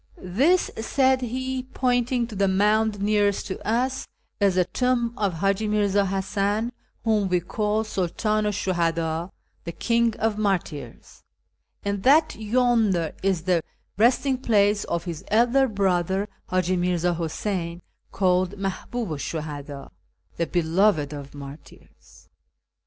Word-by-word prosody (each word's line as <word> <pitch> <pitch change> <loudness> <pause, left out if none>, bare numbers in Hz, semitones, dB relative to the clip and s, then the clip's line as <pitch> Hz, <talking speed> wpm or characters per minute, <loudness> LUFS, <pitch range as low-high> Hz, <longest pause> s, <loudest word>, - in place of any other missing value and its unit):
" - - -30 0.3
This," 360 +4 +3
said 260 +2 +2
he, 260 +2 -3
pointing 250 -1 0
to 230 -2 -9
the 200 0 +2
mound 210 +2 +2
nearest 205 -1 +2
to 190 - -5
us, 255 +4 -1 0.2
" - - -48
is 195 -2 +3
the 180 -1 +3
tomb 240 +3 0
of 200 -7 -1
Hiiji 195 +5 0
Mi'rza 205 -1 +2
Hasan, 200 +4 -1 0.3
whom 215 -4 +1
we 180 -1 +2
call 210 +4 -1
Sidtdnu 215 +2 -1
'sh 205 -1 -4
Shuhadd, 165 -1 0 0.2
' - - -43
the 170 - -3
King 230 +4 +1
of 220 -1 -1
Martyrs,' 170 - -3 0.6
and 200 -1 -1
that 305 +7 +5
yonder 220 -7 +1
is 190 -4 0
the 180 -2 +2 0.3
resting 250 +4 +2
place 205 -4 +2
of 170 0 -2
his 170 -1 -6
elder 245 +5 +3
brother, 190 -2 0 0.2
Hi'iji 185 0 +1
Mirzji 175 -1 +1
Huseyn, 170 +1 -3 0.3
called 185 0 +1
Malihuhu 195 -2 -4
'sh 165 - -4
SImhadd, 145 -2 -6 0.2
' - - -41
the 170 - 0
Beloved 170 -3 +2
of 140 -1 -8
Martyrs.' 140 +1 -13
200 Hz, 140 wpm, -24 LUFS, 175-225 Hz, 0.6 s, that